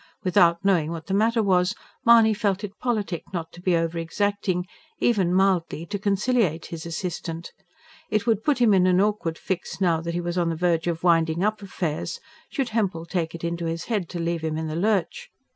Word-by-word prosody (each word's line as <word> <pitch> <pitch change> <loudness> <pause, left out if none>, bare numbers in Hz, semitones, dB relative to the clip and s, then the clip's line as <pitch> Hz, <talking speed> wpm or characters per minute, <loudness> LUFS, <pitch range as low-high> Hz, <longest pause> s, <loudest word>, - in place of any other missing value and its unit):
Without 180 -1 +3
knowing 175 -6 +3
what 165 -1 -6
the 190 - -3
matter 225 +3 +2
was, 185 +1 +2 0.3
Mahony 230 -2 +6
felt 205 -2 -1
it 205 0 -7
politic 210 -8 -1
not 165 -2 -4
to 175 - -12
be 180 -1 +2
over 165 0 -1
exacting 185 +1 -1 0.3
even 195 -7 +2
mildly 185 -3 +1
to 205 +3 -4
conciliate 200 -4 +1
his 165 0 -7
assistant. 170 -1 -5 0.6
It 215 0 0
would 220 -3 +1
put 295 -4 +2
him 235 -4 +4
in 185 -1 +4
an 180 0 +4
awkward 200 -5 0
fix, 185 0 -4
now 170 -4 +2
that 170 0 -4
he - - 0
was 175 +1 -2
on 170 -1 +1
the 165 - -1
verge 170 0 +1
of 170 0 -2
winding 165 0 +3
up 215 0 0
affairs, 175 -5 -3 0.3
should 270 -3 -2
Hempel 195 -7 -1
take 170 -2 -2
it 170 - -9
in 170 0 -1
his 165 0 -3
head 205 -8 -2
to 175 - -5
leave 170 0 -1
him 160 -1 -2
in 160 - -3
the 155 0 -4
lurch. 215 - 0
180 Hz, 205 wpm, -24 LUFS, 165-205 Hz, 0.6 s, Mahony